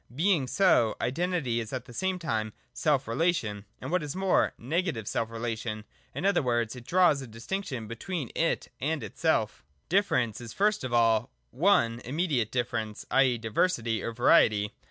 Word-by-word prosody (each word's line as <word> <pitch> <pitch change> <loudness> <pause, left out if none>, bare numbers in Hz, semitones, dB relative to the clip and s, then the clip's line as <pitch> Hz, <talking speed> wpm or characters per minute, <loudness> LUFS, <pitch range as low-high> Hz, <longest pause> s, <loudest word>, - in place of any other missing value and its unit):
Being 165 -3 +2
so, 160 - +3
Identity 140 -2 -1
is 110 -2 -5
at 130 -2 -4
the 120 - -12
same 190 +8 -1
time 110 -11 -2 0.2
self 145 -4 +1
relation, 115 - 0
and, - - -6
what 180 0 +2
is 150 +1 -5
more, 190 0 +2
negative 140 - -2
self 115 - -1
relation; 115 -1 -4 0.3
in - - -3
other 200 -2 +3
words, 120 -3 0
it 120 -1 -11
draws 175 -6 +4
a 130 - -8
distinction 120 - -5
between 135 - -5
it 165 - 0
and 150 0 -1
itself - - -1 0.3
117.J 190 - +5
Difference 125 - +1
is, 115 -2 -8
first 210 -3 +1
of 130 - -4
all, 115 -1 +3 0.3
(i) 200 -9 +6 0.2
immediate 135 - -1
differ 120 -1 -1
ence, 110 -1 -5
i.e. 130 -2 +4
Diversity 115 - 0
or 115 - -3
Variety. 110 -3 +4
125 Hz, 170 wpm, -28 LUFS, 115-170 Hz, 0.3 s, i